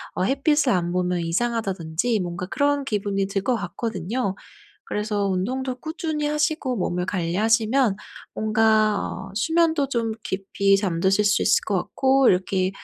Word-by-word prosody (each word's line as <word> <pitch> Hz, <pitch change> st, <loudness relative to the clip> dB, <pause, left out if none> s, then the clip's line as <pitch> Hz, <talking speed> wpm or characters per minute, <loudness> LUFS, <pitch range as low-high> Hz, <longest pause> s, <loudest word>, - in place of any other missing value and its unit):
'어 -, -, 0 dB
햇빛을 275 Hz, -, +2 dB
안 175 Hz, -1 st, 0 dB
보면 180 Hz, -1 st, 0 dB
이상하다.'든지 195 Hz, +1 st, -1 dB
뭔가 175 Hz, 0 st, -4 dB
그런 285 Hz, +4 st, +1 dB
기분이 200 Hz, -3 st, -1 dB
들 195 Hz, 0 st, -2 dB
것 250 Hz, +1 st, +1 dB
같거든요. 220 Hz, -1 st, -3 dB, 0.5 s
그래서 210 Hz, -1 st, -1 dB
운동도 250 Hz, +8 st, -2 dB
꾸준히 315 Hz, -2 st, -3 dB
하시고 300 Hz, -3 st, 0 dB
몸을 180 Hz, -2 st, -1 dB
관리하시면 215 Hz, +6 st, +1 dB, 0.4 s
뭔가 215 Hz, -1 st, +3 dB
어 195 Hz, +1 st, -5 dB
수면도 320 Hz, +3 st, +2 dB
좀 230 Hz, -4 st, -1 dB
깊이 195 Hz, +1 st, +1 dB
잠드실 195 Hz, +1 st, +1 dB
수 205 Hz, -, +3 dB
있을 -, -, +3 dB
것 -, -, 0 dB
같고 265 Hz, -1 st, +2 dB
이렇게 185 Hz, 0 st, +1 dB
210 Hz, 310 characters per minute, -23 LUFS, 190-260 Hz, 0.5 s, 뭔가